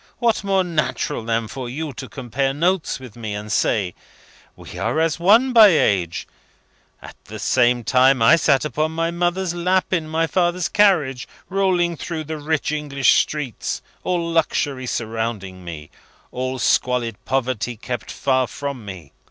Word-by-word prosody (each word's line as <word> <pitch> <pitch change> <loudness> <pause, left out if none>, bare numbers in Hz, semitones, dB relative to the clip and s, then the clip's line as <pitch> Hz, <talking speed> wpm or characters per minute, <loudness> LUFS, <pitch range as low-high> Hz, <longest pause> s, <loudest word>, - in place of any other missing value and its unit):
What 230 -3 +1
more 195 -1 +2
natural 155 -6 -2
than 115 0 -1
for 125 +3 -6
you 150 +3 -5
to - - -8
compare 135 +1 -2
notes 175 +1 0
with 125 -5 -11
me, 110 -3 -5
and 105 +1 -6
say, 100 -7 +1 0.6
'We - - -10
are 155 - 0
as 160 0 +1
one 225 +9 +4
by 225 -3 +9
age; 95 - +1 0.8
at - - -11
that - - -8
same 120 -1 +2
time 130 +2 +4
I 115 +8 +6
sat 150 -4 +2
upon 155 +3 -1
my 165 +1 -1
mother's 175 +1 -1
lap 185 +2 0
in 165 -4 0
my 160 +1 0
father's 175 +1 0
carriage, 165 -12 +2 0.2
rolling 180 -3 +1
through 160 -1 -4
the 155 0 -6
rich 150 0 -1
English 145 -3 +2
streets, 150 -6 -3 0.2
all 175 -2 -1
luxury 145 -5 0
surrounding 110 -6 -4
me, 80 -3 -8 0.4
all 130 +1 -3
squalid 120 -3 0
poverty 125 -2 -2
kept 120 +1 -5
far 130 -2 0
from 140 -3 -6
me. 95 -8 -10
140 Hz, 155 wpm, -21 LUFS, 120-170 Hz, 0.8 s, by